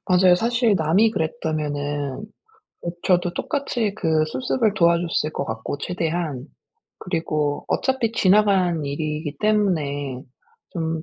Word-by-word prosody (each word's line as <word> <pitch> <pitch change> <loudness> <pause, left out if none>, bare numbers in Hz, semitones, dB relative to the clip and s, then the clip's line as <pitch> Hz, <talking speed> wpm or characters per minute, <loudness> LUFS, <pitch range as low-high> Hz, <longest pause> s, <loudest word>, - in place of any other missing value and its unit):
맞아요. 180 -1 +5
사실 230 +3 +2
남이 180 +7 +3
그랬다면은 150 - -3 0.6
그 170 - -2
저도 175 -1 +2
똑같이 245 -8 -2
그 160 -5 +2
수습을 225 +3 0
도와줬을 170 -4 +2
것 - - -2
같고 110 +3 -4
최대한 165 -5 -2 0.5
그리고 155 -5 -2
어차피 260 -4 0
지나간 190 -6 +3
일이기 150 +1 -3
때문에 150 -11 0 0.5
좀 160 -2 -3
170 Hz, 260 characters per minute, -23 LUFS, 150-205 Hz, 0.6 s, 맞아요